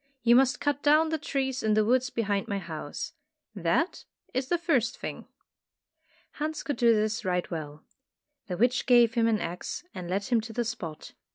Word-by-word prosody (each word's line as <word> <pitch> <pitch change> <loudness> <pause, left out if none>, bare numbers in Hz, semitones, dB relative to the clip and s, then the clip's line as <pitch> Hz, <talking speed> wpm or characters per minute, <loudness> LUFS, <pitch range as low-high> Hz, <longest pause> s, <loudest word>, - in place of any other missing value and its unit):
You 235 0 +6
must 260 0 +4
cut 290 -1 0
down 305 +2 +4
the 320 0 -1
trees 265 -2 -2
in 215 -1 +2
the 215 0 +3
woods 255 +2 +2
behind 205 -3 -1
my 200 -3 -1
house. 160 -5 -6 0.4
That 200 - 0 0.3
is 260 +1 -1
the 345 - +2
first 275 -9 +1
thing." - - -6 1.0
Hans 310 +1 -4
could 290 - -3
do 235 -3 +5
this 215 +1 0
right 180 -2 0
well. 150 -2 -6 0.6
The 180 -3 -3
witch 245 +5 +2
gave 240 -2 +6
him 230 -1 +2
an 220 -2 +2
axe 175 - -5
and 175 -1 -6
led 195 +2 0
him 230 +2 +1
to 225 +1 -8
the 240 +1 -1
spot. 165 -8 -6
230 Hz, 185 wpm, -28 LUFS, 195-265 Hz, 1.0 s, You